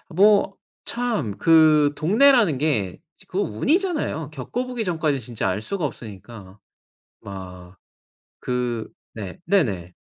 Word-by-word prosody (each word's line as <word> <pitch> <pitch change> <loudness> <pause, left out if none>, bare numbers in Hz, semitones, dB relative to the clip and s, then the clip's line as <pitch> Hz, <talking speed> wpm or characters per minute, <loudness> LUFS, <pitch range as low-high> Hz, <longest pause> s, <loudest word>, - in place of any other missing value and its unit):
뭐 200 0 +4 0.3
참 225 - -2
그 155 -3 +5
동네라는 215 - +4
게 120 - -1 0.3
그 - - -6
운이잖아요. 295 - -1
겪어 245 +10 -4
보기 250 -2 -4
전까지 160 -7 0
진짜 115 -3 -3
알 95 +3 -2
수가 175 - -3
없으니까 105 -5 -9 0.6
막 90 -2 -10 0.6
그 125 -2 -2 0.2
네. 100 -5 -7
네네. 100 - 0
145 Hz, 210 characters per minute, -23 LUFS, -, 0.6 s, 그